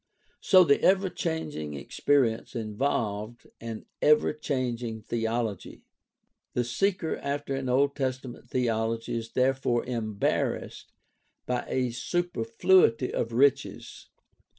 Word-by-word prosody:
So 185 -2 +6
the 140 -4 +3
ever 190 0 +3
changing 150 - -3
experience 120 - 0
involved 110 -1 -2
an 115 -1 -7 0.2
ever 150 0 +4
changing 120 -6 -3
theology. 115 -3 -3 0.7
The 125 - +2
seeker 175 +7 -1
after 140 0 -3
an 135 -1 -2
Old 140 +3 +2
Testament 130 -3 -4
theology 115 -2 -1
is 115 0 -5
therefore 130 -2 +1
embarrassed 110 -4 -2 0.5
by 125 -1 -2
a 125 -2 0
superfluity 130 -1 +2
of 115 - -1
riches. 135 +3 0
125 Hz, 105 wpm, -28 LUFS, 115-140 Hz, 0.7 s, So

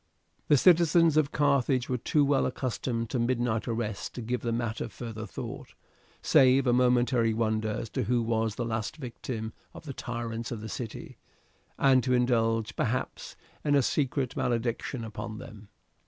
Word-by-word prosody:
The 145 - +5
citizens 165 0 +5
of 155 -2 +3
Carthage 140 -3 +2
were 125 -1 -1
too 145 +4 +2
well 140 -1 +2
accustomed 120 -3 -3
to 125 - 0
midnight 120 -2 0
arrests 110 -3 -3
to 125 - -8
give 125 +2 -2
the 120 - -2
matter 115 0 -2
further 110 -2 -7
thought, - - -8 0.5
save 130 +1 +5
a 120 - +3
momentary 125 -2 +3
wonder 110 -1 0
as 110 +1 -4
to - - -1
who 120 -1 +1
was 110 -1 0
the 120 - -2
last 110 +4 -3
victim 115 -4 -5 0.2
of - - -11
the 140 - -5
tyrants 115 -1 -5
of 115 - -4
the 110 - -6
city, 115 +1 -7 0.6
and 130 -2 +4
to 125 +1 +2
indulge, 115 -3 +1
perhaps, 125 +2 -2 0.3
in 145 -1 +2
a 140 - +4
secret 135 -1 0
malediction 120 -2 -1
upon 110 0 -6
them. 105 -1 -11
120 Hz, 165 wpm, -28 LUFS, 115-130 Hz, 0.6 s, The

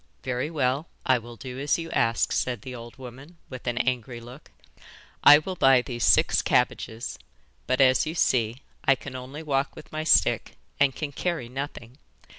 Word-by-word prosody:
'Very 130 +2 -2
well, 145 0 -1 0.2
I 130 -1 +3
will 120 +1 -11
do 130 +1 -8
as 145 +1 +1
you 165 -1 -6
ask,' 115 0 +1
said 120 -4 -1
the 130 - -7
old 120 0 -10
woman, 135 +6 -11
with 130 -1 -9
an 120 -1 -1
angry 125 -1 -1
look. 125 +5 -13 0.7
'I 145 - +10
will 185 +5 -4
buy 135 -6 +5
these 120 -2 -5
six - - +4
cabbages, 115 +1 -1 0.5
but, 130 - +1
as 130 +3 +4
you 160 - -4
see, 120 -4 +1 0.2
I 135 - +4
can 135 0 -9
only 130 +5 -7
walk 140 -2 -1
with - - -13
my 155 0 -3
stick 160 - +2 0.2
and 140 -2 +3
can 150 -2 -4
carry 165 -4 -3
nothing. 130 -1 -7
130 Hz, 180 wpm, -26 LUFS, 120-145 Hz, 0.7 s, I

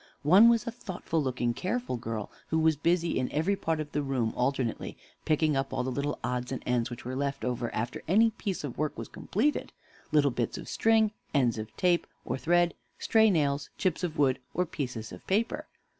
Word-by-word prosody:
One 190 +10 +8
was 230 -2 +3
a 235 - -2
thoughtful 185 -8 -3
looking, 125 -3 0
careful 235 - -2
girl, 115 -3 -4 0.2
who 160 - 0
was 160 -1 +4
busy 170 +2 +1
in 130 - -1
every 160 +7 +1
part 160 -4 -1
of 150 -1 -4
the 145 - 0
room 130 -5 -1
alternately, 125 -2 -1 0.3
picking 155 -1 +2
up 135 0 -1
all 130 - -1
the 130 - -2
little 140 +3 -2
odds 125 0 -2
and 130 - -4
ends 125 -1 +1
which 120 -1 -8
were 130 +1 -3
left 140 0 -2
after 120 -1 -2
any 220 +7 +5
piece 195 -5 -4
of 135 -3 -5
work 155 -1 -1
was - - -5
completed 275 +10 -1 0.4
little 145 -2 +4
bits 120 -1 -2
of - - -8
string, 220 -1 +3 0.2
ends 120 -5 +3
of 110 0 -8
tape 175 -2 +2 0.2
or - - -1
thread, 175 +2 +3 0.2
stray 220 -1 +4
nails, 145 -5 +1
chips 185 -3 0
of 170 -3 -2
wood, 135 -3 +3 0.2
or 180 - +2
pieces 125 -8 -5
of - - -11
paper. 215 +4 0
145 Hz, 200 wpm, -29 LUFS, 125-180 Hz, 0.4 s, One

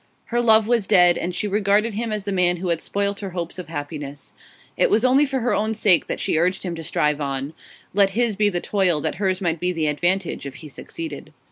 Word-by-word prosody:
Her 240 - +2
love 220 -2 +5
was 230 -5 +1
dead, 180 -4 +5
and 175 +1 -3
she 210 - -1
regarded 205 +2 +1
him 225 +2 -3
as 210 -2 -2
the 200 - -4
man 180 -2 +2
who 180 +1 -4
had 170 -1 0
spoilt 200 0 -2
her 195 - -5
hopes 170 +1 -4
of 180 - -7
happiness. 145 -2 -7 0.4
It - - +2
was 225 +3 +2
only 270 +3 +4
for 265 -2 -2
her 245 - 0
own 220 +1 0
sake 200 -5 +3
that - - -3
she 155 - 0
urged 180 +3 0
him 180 -3 -3
to 165 -1 -7
strive 150 -1 0
on; 140 +1 -3 0.4
let 200 0 +4
his 235 -3 +1
be 210 +1 +2
the 175 -3 -2
toil, 185 -6 +1
that - - -2
hers 190 -1 0
might 170 -3 -1
be 180 +2 0
the 165 -3 -2
advantage 175 +1 0
if 135 - -9
he 150 +2 -10
succeeded. 325 - -8
190 Hz, 240 wpm, -22 LUFS, 165-210 Hz, 0.4 s, love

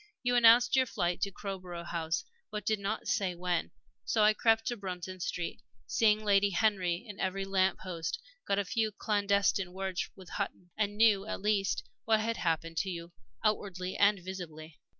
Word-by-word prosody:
You 245 0 +2
announced 240 +1 +7
your 260 -1 +4
flight 175 -5 -1
to 200 - 0
Crowborough 185 -3 -6
House, 165 -1 -2 0.3
but 210 -2 -5
did 215 -1 +1
not 200 +3 -3
say 185 -3 0
when, 175 -1 -1 0.3
so 220 - +2
I 215 +1 +6
crept 225 0 +3
to 240 - -1
Bruton 185 -3 -6
Street, 175 0 -3 0.2
seeing 215 -1 +2
Lady 200 0 +4
Henry 185 -1 +1
in 205 -2 -9
every 195 +1 -1
lamp 190 -1 +2
post, 170 - -4 0.3
got 200 - +2
a 200 - +1
few 220 +2 0
clandestine 200 -3 +1
words 190 -1 -3
with 185 -3 -13
Hutton, 175 -1 -4
and 205 -1 -1
knew, 215 -2 +4
at - - -3
least, 200 -1 +1 0.2
what 220 -1 +4
had 230 +1 -1
happened 165 -1 -1
to 200 -2 0
you 170 -1 -6 0.3
outwardly 185 -3 -1
and 205 0 +4
visibly. 165 -4 -8
195 Hz, 175 wpm, -31 LUFS, 180-215 Hz, 0.3 s, announced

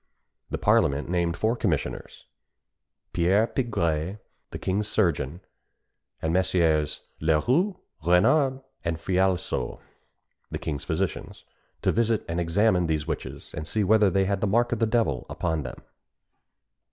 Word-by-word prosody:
The - - -2
parliament 70 +3 +2
named 85 -1 0
four 110 +2 +1
commissioners 85 - -3 0.9
Pierre 95 +5 +3
Pigray, 90 - -1 0.3
the - - -6
king's 100 +3 -1
surgeon, 85 -6 0 0.8
and 80 +1 0
Messieurs 85 -5 +2 0.2
Leroi, 125 - +2 0.3
Renard, 130 - +3 0.2
and 85 -2 -1
Falaiseau, 95 0 0 0.7
the - - -3
king's 75 -3 -4
physicians - - -3 0.4
to - - +3
visit 115 -1 +1
and 85 +1 -2
examine 90 +1 +2
these 80 -1 -1
witches, 80 - -6
and 75 +1 -5
see 110 +3 0
whether 105 +1 +5
they 95 +1 +2
had 100 0 -1
the 105 - +2
mark 120 +4 +2
of 120 - -1
the 115 - +2
devil 110 - 0
upon 80 -2 -1
them. 65 -3 -7
90 Hz, 130 wpm, -26 LUFS, 80-110 Hz, 0.9 s, whether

